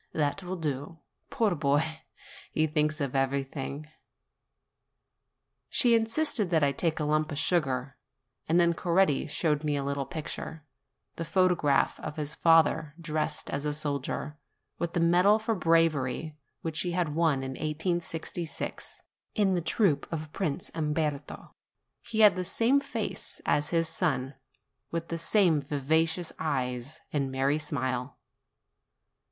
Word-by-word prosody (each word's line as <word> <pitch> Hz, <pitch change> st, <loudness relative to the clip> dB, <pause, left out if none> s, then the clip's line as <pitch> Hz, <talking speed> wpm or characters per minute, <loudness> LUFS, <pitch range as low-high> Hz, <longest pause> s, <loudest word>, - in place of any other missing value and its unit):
"That 150 Hz, +4 st, 0 dB
will 185 Hz, 0 st, -4 dB
do. 150 Hz, -1 st, -4 dB, 0.3 s
Poor 225 Hz, -7 st, +1 dB
boy! 155 Hz, +1 st, 0 dB, 0.5 s
he 155 Hz, -, +2 dB
thinks 155 Hz, 0 st, 0 dB
of 140 Hz, -2 st, -2 dB
everything." 135 Hz, +2 st, -2 dB, 1.8 s
She 240 Hz, -2 st, +4 dB
insisted 225 Hz, -, +1 dB
that 160 Hz, -3 st, +3 dB
I 140 Hz, -, +4 dB
should 140 Hz, -, -11 dB
take 165 Hz, -2 st, +1 dB
a -, -, 0 dB
lump 155 Hz, +1 st, +1 dB
of 145 Hz, -, -4 dB
sugar; 135 Hz, -5 st, 0 dB, 0.5 s
and 170 Hz, +2 st, +4 dB
then 170 Hz, -1 st, +4 dB
Coretti 170 Hz, -3 st, +2 dB
showed 150 Hz, 0 st, 0 dB
me 150 Hz, -1 st, 0 dB
a 140 Hz, -, -1 dB
little 140 Hz, 0 st, -2 dB
picture, 160 Hz, -1 st, -6 dB, 0.5 s
the 165 Hz, -, -2 dB
photo 185 Hz, +2 st, +3 dB
graph 145 Hz, -5 st, +1 dB
of 150 Hz, -, -6 dB
his 150 Hz, -1 st, 0 dB
father 160 Hz, -2 st, +3 dB
dressed 155 Hz, -1 st, -2 dB
as 140 Hz, -, -2 dB
a 150 Hz, -1 st, -1 dB
soldier, 150 Hz, 0 st, -3 dB, 0.4 s
with 170 Hz, 0 st, -2 dB
the -, -, +1 dB
medal 180 Hz, +5 st, +5 dB
for 220 Hz, +1 st, -1 dB
bravery 165 Hz, -5 st, +1 dB, 0.3 s
which 160 Hz, -1 st, -3 dB
he 175 Hz, -1 st, -1 dB
had 170 Hz, -4 st, 0 dB
won 155 Hz, -4 st, +2 dB
in 130 Hz, -, -4 dB
1866, 165 Hz, +2 st, -4 dB, 0.3 s
in 200 Hz, -3 st, +3 dB
the 175 Hz, -, +1 dB
troop 170 Hz, -3 st, +1 dB
of 155 Hz, -2 st, -5 dB
Prince 175 Hz, -3 st, -3 dB
Umberto: 150 Hz, -2 st, -2 dB, 0.5 s
he 220 Hz, -1 st, -1 dB
had 210 Hz, -3 st, +8 dB
the 185 Hz, -, -2 dB
same 230 Hz, +9 st, +3 dB
face -, -, -4 dB
as 145 Hz, 0 st, +1 dB
his 165 Hz, -1 st, +1 dB
son, 150 Hz, -5 st, -1 dB, 0.6 s
with 165 Hz, 0 st, -4 dB
the 165 Hz, -, -3 dB
same 170 Hz, -4 st, +3 dB
vivacious 160 Hz, +4 st, 0 dB
eyes 130 Hz, -3 st, -2 dB
and 140 Hz, -3 st, 0 dB
merry 135 Hz, +3 st, +1 dB
smile. 130 Hz, -3 st, -2 dB
155 Hz, 145 wpm, -29 LUFS, 145-170 Hz, 1.8 s, had